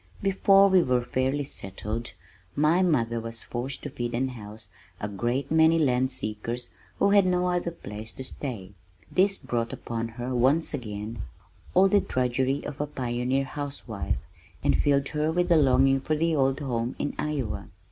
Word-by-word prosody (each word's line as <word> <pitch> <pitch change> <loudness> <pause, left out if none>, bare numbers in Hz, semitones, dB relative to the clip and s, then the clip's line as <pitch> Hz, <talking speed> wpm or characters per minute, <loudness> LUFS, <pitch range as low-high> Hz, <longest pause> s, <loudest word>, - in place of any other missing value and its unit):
Before 195 0 +5
we 190 -2 +5
were 125 -5 +1
fairly 130 +3 0
settled, 110 0 -6 0.4
my 155 +5 +3
mother 120 -10 +2
was 115 0 -6
forced 130 +3 -4
to 145 - -5
feed 120 -2 -3
and 130 +2 0
house 110 -2 -10 0.3
a 105 - -3
great 120 +8 -2
many 160 +1 +5
land 130 -4 +2
seekers 120 0 -5 0.3
who 200 - +3
had 200 -2 +5
no 180 0 +2
other 175 -1 0
place 110 -9 -8
to 130 - -7
stay. 120 -8 -5 0.4
This 195 +1 +3
brought 115 -1 -2
upon 115 -1 -4
her 120 +2 -5
once 135 +8 +2
again 110 -4 -5 0.5
all 190 +2 +7
the 200 +1 +4
drudgery 130 +2 0
of 145 0 -5
a 150 - -1
pioneer 125 0 -1
house 145 0 -6
wife, 100 - -2 0.5
and - - +3
filled 140 -1 +2
her 150 +1 0
with 175 +1 +1
longing 135 -3 +5
for 155 - 0
the 165 +1 +1
old 135 0 +2
home 120 -3 -2
in 145 - -2
Iowa. 145 -8 -2
130 Hz, 165 wpm, -27 LUFS, 120-155 Hz, 0.5 s, all